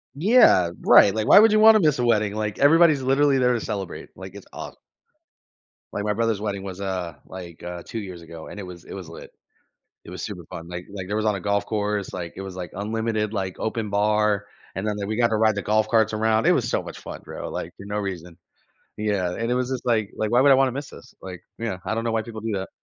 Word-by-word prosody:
Yeah, 155 - +5
right, 100 - +7
like, 110 -1 -2
why - - +8
would 225 0 +6
you 215 - +4
want 220 0 +8
to - - +5
miss 145 -4 +2
a 120 - +1
wedding? 105 -3 +2
Like, 105 -1 -3
everybody's 155 0 +5
literally 135 +1 +3
there 125 -1 +3
to 115 - -1
celebrate, 100 -5 -5
like, 95 0 -10
it's 100 - -11
awesome. - - -8 1.2
Like, 105 - -3
my 105 0 0
brother's 115 -2 0
wedding 100 -2 -3
was, 95 0 -7
uh, 90 -3 -3
like, 85 -3 -10 0.2
2 115 - -5
years 95 -4 -8
ago, 80 -1 -10
and 105 - -9
it - - -5
was 90 -2 -10
it - - -9
was 95 -3 -8
lit. 85 - -11 0.7
It - - -12
was - - -7
super - - -6
fun, 85 0 -9
like 90 0 -6
like, 95 -2 -7
there 105 +2 -2
was 110 - -1
on 105 -2 +2
a 95 - -5
golf 100 +1 0
course, 105 -2 -2
like, 85 -2 -5
it 95 - -5
was, 95 -1 -7
like, 90 -3 -6
unlimited, 110 +1 -2
like, 95 -3 -3
open 110 -1 -2
bar, 105 0 +1 0.3
and 95 +3 -3
then 105 - -1
we 110 +1 -2
got 120 -1 +4
to 110 - +1
ride 110 -1 +3
the 100 - -2
golf 110 +1 +1
carts 110 -2 +3
around, 110 +1 +1
it - - +6
was - - 0
so - - 0
much - - -9
fun, - - -9
bro, - - -7
like, - - -5
for 100 - -11
no 105 +1 -3
reason. 90 -4 -5 0.6
Yeah, 100 -4 -1
and 115 +1 -2
it - - +2
was 125 +1 -1
just, 130 -1 -4
like 110 -4 +1
like, 110 0 -1
why 120 - +4
would 140 +2 +5
I - - +8
want 135 0 +4
to - - -4
miss 140 +2 -6
this, - - -14
like, 90 -2 -8 0.2
yeah, 115 -5 -3
I - - 0
don't 115 +1 -2
know 115 - -1
why 110 0 0
people 110 -1 -8
do 110 0 -3
that. 95 -1 -3
105 Hz, 260 wpm, -24 LUFS, 95-115 Hz, 1.2 s, why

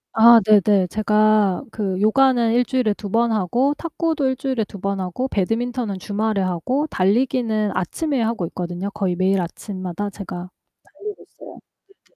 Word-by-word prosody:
아 230 +1 +8
네네. 205 -2 +4
제가 215 0 +2
그 195 -4 -3
요가는 240 +1 +3
1 245 +1 +3
주일에 255 -5 +1
2 205 -1 -8
번 230 +2 +2
하고 235 +8 +1
탁구도 320 -2 -2
1 260 - -1
주일에 260 -4 -2
2 200 - -10
번 195 +1 -2
하고 185 +8 -3
배드민턴은 230 +1 -2
주말에 210 +2 -2
하고 185 - -1
달리기는 220 -1 +1
아침에 275 - -2
하고 225 -6 -1
있거든요. 180 +3 -5
거의 185 -3 -2
매일 190 +1 +1
아침마다 185 +2 -5
제가 185 -2 -7 0.3
달리고 420 0 -9
있어요. - - -14 0.5
네네. - - -37
215 Hz, 320 characters per minute, -21 LUFS, 190-245 Hz, 0.5 s, 아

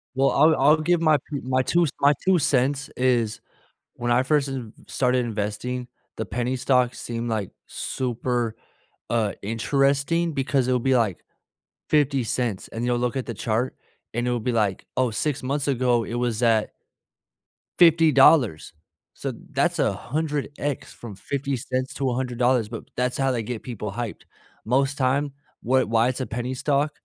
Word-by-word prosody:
Well, 135 +1 +3
I'll 155 +2 +5
I'll 150 +4 +5
give 170 +2 +1
my 155 -2 +5
pu 145 -1 -6
my 130 0 +1
2 170 +6 +2
my 145 +1 +5
2 185 -2 +4
cents 140 +1 +1
is 120 -4 +1 0.5
when 120 0 -2
I 125 +2 +4
first 145 0 +1
ev 125 -5 -5 0.2
started 125 -1 +1
investing, 115 +3 -3 0.3
the - - -2
penny 125 +4 -2
stocks 125 -1 +1
seemed, 120 0 -4
like, 110 -4 -2 0.2
super, 120 -2 -2 0.5
uh, 110 -4 +1
interesting 140 +9 +1
because 135 -1 0
it'll 125 - +2
be, 130 +2 +2
like, 110 -7 0 0.7
$0.50, 130 -7 0
and 115 +2 -4
you'll 120 -1 +1
look 125 +2 -1
at 130 - -2
the - - -3
chart, 115 +3 -1 0.4
and 120 +1 -1
it 125 - +1
will 120 - 0
be 120 +3 -1
like, 105 -4 0
"Oh, 130 -2 +2
6 135 +6 -2
months 140 +2 -1
ago 125 -3 +2
it 120 - -5
was 120 -2 -1
at" 110 -2 +3 1.1
$50, 150 - +5 0.4
so - - -4 0.2
that's - - +1
100x 145 0 -2
from 115 -4 -9
$0.50 130 +2 -3
to 135 -2 -1
$100, 125 -2 +1
but 115 -1 -7
that's 125 0 0
how 135 0 +2
they 115 -3 -1
get 115 0 -5
people 105 -5 -5
hyped. 120 0 -5 0.4
Most 135 +4 +1
time, 140 +2 +1 0.3
wa 130 +2 +3
why 115 +1 +2
it's 130 - -3
a - - -1
penny 125 +2 -4
stock, 145 +2 +1
125 Hz, 160 wpm, -24 LUFS, 120-140 Hz, 1.1 s, I'll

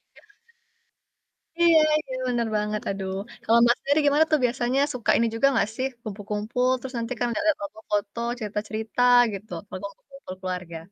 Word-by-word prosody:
Iya. - - -20 1.3
Iya 335 -2 +6 0.2
iya, 265 -4 -7
bener 240 -2 0
banget, 210 0 -2
aduh. 195 -1 -3 0.3
Kalau, 230 +1 +4
Mbak, 240 0 +5
sendiri 285 +2 +1
gimana 295 +2 +4
tuh 310 - +4
biasanya 245 +2 0
suka 250 -3 -4
ini 230 - +2
juga 275 +4 +4
gak - - +2
sih, 260 +2 -1 0.2
kumpul-kumpul 210 +4 -2
terus 260 +1 -8
nanti 230 +1 -3
kan 245 - +1
lihat-lihat 315 +4 +1
foto-foto, 210 +1 -4 0.2
cerita-cerita 215 +2 -3 0.3
gitu, 200 +1 -8 0.2
kalau 185 +2 -5
kumpul-kumpul 275 -9 -12
keluarga? 180 -3 -5
230 Hz, 155 wpm, -25 LUFS, 210-260 Hz, 1.3 s, Iya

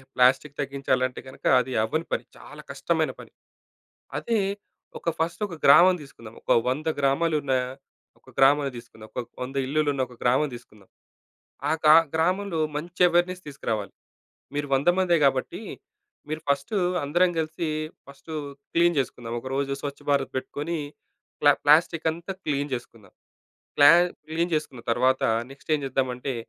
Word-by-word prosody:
Plastic 130 +3 +3
తగ్గించాలంటే 135 -2 -1
గనక 130 - -13
అది 130 +1 -3
అవ్వని 155 +9 -1
పని. - - -1
చాలా - - -12
కష్టమైన - - 0
పని. - - -12 0.9
అదే 230 -2 0 0.6
ఒక 170 - -1
ఫస్ట్ 165 +4 -2
ఒక 175 - -8
గ్రామం 180 +6 +8
తీసుకుందాం. 115 -5 -13
ఒక - - -3 0.2
100 150 +5 -2
గ్రామాలున్న 145 0 +1 0.7
ఒక - - -20
గ్రామాన్ని 140 0 +4
తీసుకుందాం. 110 -2 -12
ఒక 125 - -3 0.2
100 130 +2 -7
ఇల్లులున్న 145 -1 0
ఒక 125 - -15
గ్రామం 130 +5 +2
తీసుకుందాం. 105 -5 -16 0.8
ఆ - - +1
గ్రా 150 - +8 0.2
గ్రామంలో 180 +2 0 0.2
మంచి 175 +4 -2
అవేర్నెస్ 175 +1 +1
తీసుకురావాలి. 110 -8 -4 0.6
మీరు 145 0 -2
100 140 +6 +2
మందే 180 -3 +3
కాబట్టి, 135 -1 0 0.7
మీరు 155 +1 -3
ఫస్టు 140 +8 0 0.3
అందరం 175 +6 +3
కలిసి 160 +1 -2 0.4
ఫస్టు 140 +3 -11 0.4
క్లీన్ 170 0 +3
చేసుకుందాం 120 -2 -4
ఒకరోజు 135 +2 -3
స్వచ్ఛ 140 -1 -5
భారత్ 140 -1 +1
పెట్టుకొని 150 +5 -3 0.6
ప్లా 145 0 +7
ప్లాస్టికంతా 165 +3 +2
క్లీన్ 145 -1 -1
చేసుకుందాం. 115 -5 -8 0.7
ప్లా 145 0 +8 0.4
క్లీన్ 170 +2 -1
చేసుకున్న 145 -5 -2
తర్వాత 130 +2 +2 0.3
నెక్స్ట్ 135 +4 -15
ఏం - - -3
చేద్దామంటే, 130 0 -2
145 Hz, 135 wpm, -25 LUFS, 130-165 Hz, 0.9 s, గ్రామం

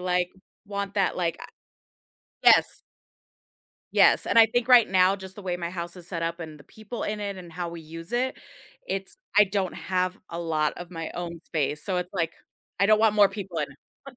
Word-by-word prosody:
like, 180 0 0 0.4
want 200 0 -4
that, 195 -2 +1
like, 170 -2 0
a - - -10 1.0
yes. - - +5 1.1
Yes, - - +5
and 230 - +3
I 225 - +9
think 245 +2 -1
right 245 -3 +7
now, 185 +1 +4
just 190 -1 -10
the 205 - -9
way 180 -1 -2
my 170 -1 -4
house 170 0 -5
is 175 -1 -10
set 170 -3 -3
up 165 +1 -2
and 155 -2 -8
the 145 - -16
people 220 +2 -8
in 210 0 -3
it 200 -1 -3
and 175 -3 -10
how 175 0 -4
we 170 0 -7
use 165 +5 -10
it, 255 +2 0 0.5
it's 195 0 -4 0.2
I 210 - +9
don't 190 -2 -2
have 185 +1 -1
a 170 - -6
lot 155 -2 0
of 175 0 -8
my 165 -2 -5
own 170 -1 -5
space, 150 -1 -2
so 190 - -1
it's, 180 +1 -4
like, 165 -3 -1 0.5
I 200 - +5
don't 215 0 +5
want 220 -1 +4
more 205 -1 +6
people 195 -4 -6
in 150 - 0 0.4
it. 260 - -14
185 Hz, 210 wpm, -26 LUFS, 170-200 Hz, 1.1 s, I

